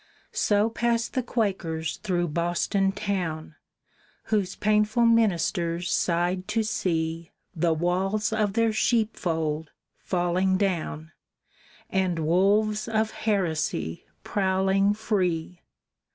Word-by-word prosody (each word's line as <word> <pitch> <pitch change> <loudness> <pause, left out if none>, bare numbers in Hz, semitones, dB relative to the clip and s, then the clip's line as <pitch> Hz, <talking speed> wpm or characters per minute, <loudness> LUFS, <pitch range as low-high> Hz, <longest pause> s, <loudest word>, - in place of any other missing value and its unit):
So 205 +1 +2
passed 235 0 0
the 260 - +1
Quakers 185 -9 -2
through 175 -4 -1
Boston 175 +4 0
town, 175 -7 -3 0.8
Whose 200 -3 +1
painful 215 +2 +2
ministers 175 -6 +1
sighed 175 +2 0
to 225 0 0
see 165 -6 -2 0.3
The 165 0 +2
walls 190 +6 0
of 210 -2 +1
their 230 0 +2
sheep 220 0 +1
fold 160 -3 -2 0.3
falling 185 +1 +1
down, 160 - -2 0.8
And 185 -3 +1
wolves 200 +7 +2
of 220 -1 0
heresy 160 - -1 0.2
prowling 195 +1 +1
free. 180 -5 -1
190 Hz, 100 wpm, -26 LUFS, 170-215 Hz, 0.8 s, So